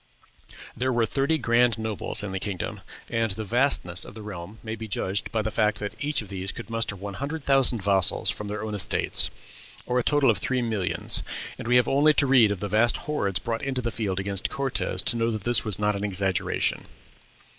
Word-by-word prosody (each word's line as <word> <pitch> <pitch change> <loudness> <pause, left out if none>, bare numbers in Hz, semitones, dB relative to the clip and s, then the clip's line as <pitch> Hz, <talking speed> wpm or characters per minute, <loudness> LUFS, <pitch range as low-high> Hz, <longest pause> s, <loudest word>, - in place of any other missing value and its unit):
There 130 +2 0
were 120 -2 +2
thirty 140 +7 +1
grand 120 -3 +2
nobles 110 -2 -3
in 105 - -4
the 95 - -3
kingdom, 95 -3 -4 0.3
and 115 -1 +1
the 105 +3 -3
vastness 110 -6 +1
of - - -11
the 110 - -9
realm 100 0 -8
may 110 -1 -4
be 110 0 -7
judged 100 0 -1
by 110 -1 0
the 110 - -2
fact 105 0 +1
that 105 0 -4
each 145 -5 -1
of 100 - -13
these 95 0 -4
could 115 -1 -9
muster 115 -3 -1
one 100 +1 -7
hundred 140 +8 -5
thousand 135 -6 +2
vassals 95 0 +4
from 105 0 -6
their 105 +1 -4
own 110 -1 -4
estates, 100 -4 +1
or 125 0 +1
a - - 0
total 145 -3 +4
of 100 - -2
three 125 +3 -1
millions. 110 -6 +1 0.4
And - - -6
we 125 - +3
have 125 -1 +5
only 145 +2 +4
to 140 - +4
read 125 -6 +5
of 100 - -4
the 105 - -2
vast 110 +4 +3
hordes 100 - -1
brought 115 -2 -3
into 135 -2 -1
the 115 - -1
field 100 -5 -2
against 100 0 -1
Cortez 135 -2 -1
to - - 0
know 115 0 +1
that 110 -3 -3
this 120 -3 +3
was 105 -3 +2
not 105 0 0
an 100 - -4
exaggeration. 95 -2 0
110 Hz, 220 wpm, -25 LUFS, 100-125 Hz, 0.4 s, have